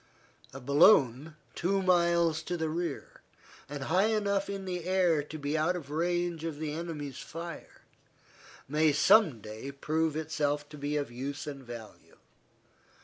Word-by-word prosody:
A 135 Hz, -, -8 dB
balloon, 140 Hz, -, +4 dB, 0.2 s
two 195 Hz, +2 st, 0 dB
miles 170 Hz, -3 st, +3 dB
to 175 Hz, +2 st, -3 dB
the 160 Hz, -1 st, -1 dB
rear, 170 Hz, +2 st, -4 dB, 0.5 s
and 145 Hz, -1 st, -5 dB
high 185 Hz, +8 st, +3 dB
enough 200 Hz, -3 st, 0 dB
in 195 Hz, -1 st, -4 dB
the 180 Hz, -2 st, -4 dB
air 180 Hz, -4 st, +3 dB
to 150 Hz, +2 st, -8 dB
be 145 Hz, 0 st, -2 dB
out 160 Hz, +4 st, +1 dB
of 150 Hz, -5 st, -7 dB
range 175 Hz, +1 st, -1 dB
of 165 Hz, -3 st, -4 dB
the 150 Hz, -1 st, -3 dB
enemy's 150 Hz, -5 st, -5 dB
fire 170 Hz, +1 st, -8 dB, 0.8 s
may 150 Hz, +2 st, +3 dB
some 150 Hz, -, +5 dB
day 110 Hz, +6 st, -7 dB
prove 155 Hz, +2 st, -1 dB
itself 150 Hz, -2 st, -1 dB
to 150 Hz, -, -10 dB
be 145 Hz, +1 st, -1 dB
of 145 Hz, -4 st, -3 dB
use 135 Hz, +4 st, -5 dB
and 140 Hz, -2 st, -7 dB
value. 120 Hz, -3 st, -11 dB
155 Hz, 150 wpm, -30 LUFS, 145-175 Hz, 0.8 s, some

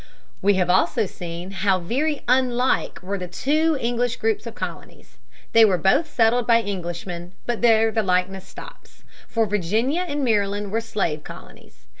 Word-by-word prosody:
We 200 Hz, 0 st, +3 dB
have 180 Hz, -2 st, +1 dB
also 210 Hz, +4 st, +2 dB
seen 175 Hz, 0 st, -7 dB
how 195 Hz, 0 st, +1 dB
very 275 Hz, -, -2 dB
unlike 250 Hz, -4 st, +1 dB
were 195 Hz, +2 st, -3 dB
the 180 Hz, -, -5 dB
two 305 Hz, -, +1 dB
English 240 Hz, 0 st, -1 dB
groups 445 Hz, -2 st, -1 dB
of -, -, -8 dB
colonies. -, -, -8 dB, 0.3 s
They 230 Hz, -, +7 dB
were 195 Hz, -4 st, +4 dB
both 235 Hz, -, +2 dB
settled 230 Hz, +1 st, +2 dB
by 230 Hz, -1 st, +4 dB
Englishmen, 175 Hz, -2 st, -5 dB
but 240 Hz, -2 st, -2 dB
there 225 Hz, -1 st, +4 dB
the 220 Hz, -, +1 dB
likeness 185 Hz, 0 st, -1 dB
stops. -, -, -13 dB, 0.2 s
For 225 Hz, -1 st, +1 dB
Virginia 215 Hz, -, 0 dB
and 290 Hz, -2 st, -2 dB
Maryland 205 Hz, -3 st, 0 dB
were 225 Hz, +2 st, 0 dB
slave 185 Hz, -9 st, -2 dB
colonies. -, -, -13 dB
215 Hz, 160 wpm, -23 LUFS, 185-245 Hz, 0.3 s, They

